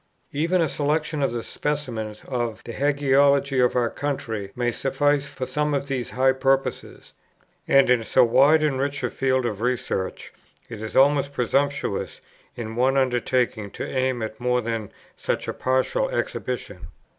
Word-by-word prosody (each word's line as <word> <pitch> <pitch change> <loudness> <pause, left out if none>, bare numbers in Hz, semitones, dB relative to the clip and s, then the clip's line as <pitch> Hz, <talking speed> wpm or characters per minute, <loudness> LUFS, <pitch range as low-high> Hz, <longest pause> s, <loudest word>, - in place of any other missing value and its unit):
Even 170 +5 +1
a 165 - +2
selection 150 +1 -1
or 120 -4 -1
specimens 120 -8 -4
of 120 -4 -3
the 115 - -7
Hagiology 140 -1 +3
of 125 - +2
our 120 -2 +1
country 110 -8 -4
may 120 -1 0
suffice 145 +3 0
for 130 - -5
some 150 +2 -1
of 140 0 -2
these 130 -3 -3
high 130 +1 +3
purposes; 135 0 -1 0.5
and 135 0 +5
in 125 -2 +3
so 125 +4 +4
wide 140 +6 +5
and 140 -4 +1
rich 140 +1 -2
a - - -1
field 130 -1 0
of 105 -3 -3
research 120 -6 -2 0.4
it 110 -2 -7
is 110 - -6
almost 140 0 +4
presumptuous 140 -2 -1 0.4
in 110 -2 -6
one 130 +3 +2
undertaking 125 -4 0
to - - -6
aim 130 -3 -1
at 110 0 -6
more 125 0 +1
than 115 -3 -4 0.2
such - - -2
a - - -2
partial 130 - 0
exhibition. - - -4
130 Hz, 155 wpm, -24 LUFS, 120-140 Hz, 0.5 s, and